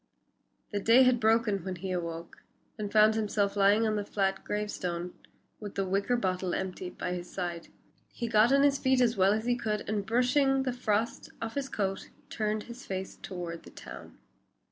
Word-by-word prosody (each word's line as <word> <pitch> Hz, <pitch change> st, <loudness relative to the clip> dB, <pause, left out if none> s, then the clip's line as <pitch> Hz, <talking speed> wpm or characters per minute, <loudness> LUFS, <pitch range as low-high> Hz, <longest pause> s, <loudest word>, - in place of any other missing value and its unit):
The 205 Hz, -, -1 dB
day 230 Hz, +6 st, +6 dB
had 255 Hz, -1 st, +4 dB
broken 220 Hz, -3 st, +2 dB
when 190 Hz, 0 st, -4 dB
he 185 Hz, +2 st, -5 dB
awoke, 170 Hz, -2 st, -4 dB, 0.4 s
and 210 Hz, -2 st, -5 dB
found 215 Hz, 0 st, +6 dB
himself 210 Hz, -2 st, 0 dB
lying 205 Hz, +3 st, +4 dB
on 215 Hz, -1 st, +1 dB
the 205 Hz, -, -1 dB
flat 195 Hz, -1 st, -1 dB
gravestone, 180 Hz, -4 st, -3 dB, 0.5 s
with 205 Hz, -2 st, -8 dB
the 195 Hz, -, 0 dB
wicker 200 Hz, +6 st, +1 dB
bottle 185 Hz, -4 st, -1 dB
empty 185 Hz, -1 st, -4 dB
by 180 Hz, -, -4 dB
his 175 Hz, 0 st, -6 dB
side. 175 Hz, -3 st, -4 dB, 0.4 s
He 235 Hz, -, -4 dB
got 225 Hz, +2 st, +4 dB
on 275 Hz, 0 st, +5 dB
his 280 Hz, -1 st, +3 dB
feet 260 Hz, -1 st, +3 dB
as 240 Hz, -2 st, +3 dB
well 190 Hz, 0 st, +4 dB
as 220 Hz, +2 st, 0 dB
he 245 Hz, 0 st, +2 dB
could, 215 Hz, -3 st, -3 dB
and 210 Hz, -1 st, -1 dB
brushing 265 Hz, +5 st, +2 dB
the 255 Hz, -2 st, -1 dB
frost 230 Hz, -2 st, -1 dB
off 225 Hz, 0 st, -4 dB
his 275 Hz, -1 st, -3 dB
coat, 195 Hz, -2 st, -2 dB, 0.2 s
turned 215 Hz, -1 st, -1 dB
his 240 Hz, +3 st, -10 dB
face 190 Hz, -3 st, -5 dB
toward 175 Hz, -3 st, -6 dB
the -, -, -13 dB
town. -, -, -11 dB
210 Hz, 190 wpm, -29 LUFS, 190-235 Hz, 0.5 s, day